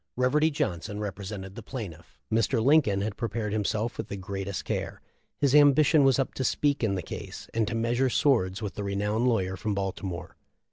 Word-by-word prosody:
Reverdy 145 +5 +3
Johnson 105 - -3
represented 100 -1 -5
the 115 - -8
plaintiff. 100 - -8 0.2
Mr. 115 +2 +2
Lincoln 120 -6 +4
had 105 0 -3
prepared 110 -2 -2
himself 110 +2 -1
with - - -3
the 100 - -5
gre 95 +1 -5 0.2
' - - -21
care; - - -3 0.4
his 140 -2 +2
ambition 145 +1 +6
was 135 -1 +4
up 135 - -1
to 130 - -3
speak 140 +1 +1
in 100 -3 +1
the 90 - -3
case - - -8
and 110 -2 +1
to - - -2
measure 120 +3 +1
swords 115 -8 +2
with 100 -4 -3
the 105 - -5
renowned 105 +4 0
lawyer 95 -6 +1
from 105 +1 -2
Baltimore. 95 -2 -4
110 Hz, 190 wpm, -27 LUFS, 100-130 Hz, 0.4 s, ambition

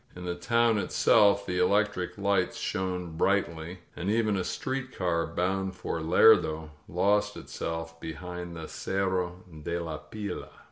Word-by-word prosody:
In 90 0 -7
the 90 - -1
town 115 +4 +2
itself 100 0 +4
the 90 -1 -1
electric 100 0 +1
lights 100 -2 +1
shone 90 -3 -3
brightly, 90 -2 0
and 90 - -3
even 110 -1 +2
a 95 - 0
street 130 +5 -3
car 85 -3 +1
bound 95 +3 -1
for 85 -2 -3
Lerdo 80 -1 +5 0.2
lost 105 +4 +2
itself 80 0 -5
behind 90 +2 -6
the 80 -1 -6
Cerro 95 -2 -2 0.2
de 85 +3 -2
la 80 -3 -4
Fila. 105 -2 -6
90 Hz, 140 wpm, -29 LUFS, 85-100 Hz, 0.2 s, Lerdo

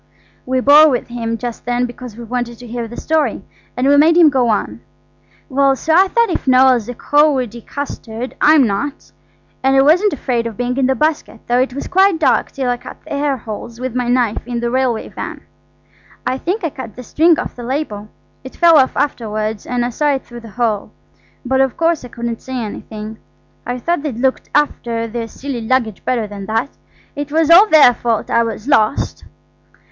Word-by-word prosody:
We 260 0 0
bore 295 +3 +7
with 245 -3 -2
him 230 -1 -3
just 240 0 -6
then 245 0 +1
because 245 -2 -9
we 240 - -8
wanted 240 0 -4
to 245 - -12
hear 235 0 -5
the 240 - -10
story. 315 -1 0 0.3
And 255 +2 +1
we 285 +1 +5
made 325 +3 +5
him 325 -4 +7
go 255 -3 +2
on. 210 - -1 0.7
"Well–so 275 +2 +1
I 375 +4 +5
thought 465 +1 +1
if - - -3
Noël's 255 -3 +4
a 245 - -5
cowardy 265 -6 +1
custard 250 -3 -6
I'm 300 -3 +6
not–and 270 +3 -4
I - - +5
wasn't 360 +8 +4
afraid 240 -4 -2
of 225 - -8
being 245 0 -2
in 265 -2 +2
the 265 - +1
basket, 305 -5 -1
though 245 +1 +1
it 255 0 -1
was 280 - -5
quite 380 -1 +3
dark 315 - +2
till 265 -2 -3
I 245 - -1
cut - - -11
the 310 - -8
air 280 -1 0
holes 230 0 -8
with 255 -1 -4
my 250 -1 -1
knife 240 -3 +1
in 240 -1 -3
the 235 0 -2
railway 255 -3 0
van. - - -7 0.8
I 260 - -1
think 385 +8 -2
I 325 - -1
cut 250 -6 -9
the 250 - -9
string 320 +6 +3
off - - -5
the 245 - -9
label. 235 -5 -4 0.4
It 260 - -10
fell 335 -3 +6
off 260 - +1
afterwards, 215 -6 -2
and 245 -1 -1
I 245 - -3
saw 290 +3 +1
it 265 - -6
through 240 0 -10
the 230 -1 -12
hole, 220 -4 -1 0.6
but 265 +1 +2
of 270 -2 0
course 330 -3 +1
I - - -8
couldn't 235 -1 -5
say 260 - -7
anything. 215 -1 -7 0.5
I 245 +1 -2
thought 340 +5 -1
they'd 285 -6 -4
look 260 +2 +1
after 235 -6 0
their 230 0 -5
silly 260 +1 -6
luggage 225 -3 -1
better 240 -4 0
than 200 -1 -8
that. 225 +5 -1 0.4
It 290 0 -5
was 320 +1 +2
all 380 +6 +8
their 305 -9 +7
fault 230 -2 -2
I 235 - +3
was 225 0 -4
lost." 250 -4 +1
250 Hz, 205 wpm, -17 LUFS, 235-290 Hz, 0.8 s, all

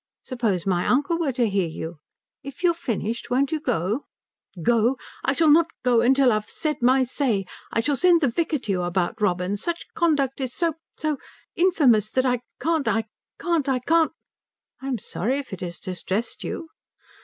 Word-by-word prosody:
Suppose 225 -9 -1
my 180 -2 +1
uncle 290 +6 +2
were 310 -5 +1
to 240 -1 +2
hear 195 -4 +1
you? 160 0 -7 0.4
If 275 +6 -10
you've 345 -1 +4
finished 235 - -3
won't 265 +2 +1
you 315 - 0
go?" 215 - -1 0.6
"Go? 240 +4 +3 0.3
I 265 - +2
shall 315 +1 +4
not 330 +2 +6 0.2
go 245 -2 +4
till 270 -2 +5
I - - +3
have 215 0 -2
said 305 -1 -2
my 260 +2 +5
say. 245 -6 0 0.3
I 230 - +1
shall 290 +4 +1
send 345 +3 +4
the 285 - +3
vicar 310 +5 0
to 220 -6 -4
you 185 -2 0
about 175 +3 -1
Robin 185 0 +1
such 340 +10 -4
conduct 285 -5 +1
is 255 -1 -3
so 335 -2 +1 0.2
so 305 -2 -1 0.4
infamous 280 - +4
that 260 +3 +1
I 250 -1 +2 0.2
can't 315 +1 0
I 225 -1 +1 0.3
can't 335 -5 0
I 265 - +2
can't 320 +4 +2 0.4
" - - -47
"I'm 265 -2 -2
sorry 230 +5 -2
if 280 -7 -6
it 190 - -6
has 175 -1 -5
distressed 190 +5 -3
you." 325 - -5
255 Hz, 190 wpm, -24 LUFS, 210-300 Hz, 0.6 s, not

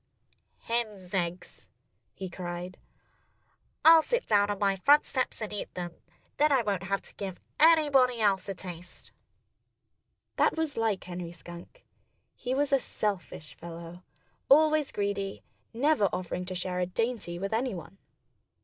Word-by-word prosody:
Hens' 215 -6 -3
eggs!" 180 -1 -3 0.5
he 190 - -5
cried. 175 0 -6 1.1
"I'll 325 0 +9
sit 485 +8 -1
down 205 -1 +3
on 205 - -1
my 195 -1 +2
front 290 +10 +5
steps 255 -3 -2
and 210 - -5
eat 205 - -4
them. 175 -1 -4 0.4
Then 300 +1 +4
I 265 -4 +4
won't 200 -4 -1
have 195 0 0
to - - -10
give 190 -3 -6 0.2
anybody 290 -6 +5
else 200 -2 +2
a 195 - -3
taste." 180 -1 -10 1.3
That - - +3
was 320 -3 -1
like 225 -4 0
Henry 175 -1 -6
Skunk. 175 - -12 0.5
He 255 +1 -3
was 280 0 +1
a 275 - +5
selfish 195 -10 -4
fellow 170 +1 -9 0.5
always 310 0 +5
greedy, 200 -1 -3 0.3
never 275 -1 +2
offering 180 0 -3
to 185 0 -5
share 180 0 -2
a 180 - 0
dainty 225 -3 -2
with 195 +4 -3
anyone. 195 -6 -3
200 Hz, 140 wpm, -29 LUFS, 180-255 Hz, 1.3 s, I'll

